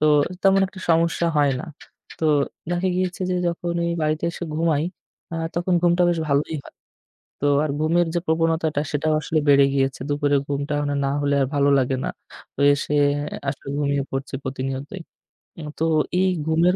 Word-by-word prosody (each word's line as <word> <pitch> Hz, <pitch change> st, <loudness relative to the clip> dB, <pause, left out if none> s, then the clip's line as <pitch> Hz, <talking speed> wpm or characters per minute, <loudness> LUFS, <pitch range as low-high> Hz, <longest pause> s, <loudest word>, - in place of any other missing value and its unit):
তো 155 Hz, -, +1 dB, 0.4 s
তেমন 195 Hz, 0 st, +5 dB
একটা 190 Hz, 0 st, -12 dB
সমস্যা 165 Hz, +1 st, +2 dB
হয় 145 Hz, -2 st, +4 dB
না -, -, -6 dB, 0.6 s
তো -, -, -1 dB, 0.5 s
দেখা 175 Hz, +2 st, 0 dB
গিয়েছে 185 Hz, 0 st, -2 dB
যে -, -, +1 dB
যখনই 170 Hz, 0 st, -2 dB
বাড়িতে 155 Hz, +2 st, 0 dB
এসে 175 Hz, -, -6 dB
ঘুমাই 160 Hz, -2 st, +1 dB, 0.5 s
আ -, -, -3 dB, 0.2 s
তখন 175 Hz, +1 st, 0 dB
ঘুমটা 175 Hz, +1 st, +3 dB
বেশ 170 Hz, -1 st, +1 dB
ভালোই 145 Hz, +3 st, +1 dB
হয়। -, -, -15 dB, 0.7 s
তো 145 Hz, -, +1 dB, 0.2 s
আর 150 Hz, -, -1 dB
ঘুমের 170 Hz, +2 st, +2 dB
যে -, -, +2 dB
প্রবণতাটা 160 Hz, -2 st, +1 dB
সেটাও 155 Hz, +1 st, 0 dB
আসলে 155 Hz, -, -1 dB
বেড়ে 140 Hz, -1 st, +7 dB
গিয়েছে 135 Hz, -1 st, 0 dB
দুপুরের 145 Hz, -1 st, +2 dB
ঘুমটা 140 Hz, +1 st, -2 dB
মানে 145 Hz, 0 st, -1 dB
না -, -, +1 dB
হলে 145 Hz, 0 st, +1 dB
আর -, -, +1 dB
ভালো 140 Hz, 0 st, +3 dB
লাগে 130 Hz, 0 st, +1 dB
না। -, -, -1 dB, 0.5 s
তো -, -, -7 dB
এসে 145 Hz, +1 st, -3 dB, 0.5 s
আসলে 140 Hz, 0 st, -4 dB
ঘুমিয়ে 140 Hz, -1 st, +1 dB
পড়ছি 135 Hz, 0 st, -4 dB
প্রতিনিয়তই 135 Hz, +6 st, -4 dB, 0.6 s
উম 150 Hz, -, -6 dB
তো -, -, +1 dB, 0.4 s
এই 190 Hz, -, +3 dB, 0.2 s
ঘুমের 165 Hz, +3 st, +3 dB
155 Hz, 170 wpm, -23 LUFS, 140-170 Hz, 0.7 s, বেড়ে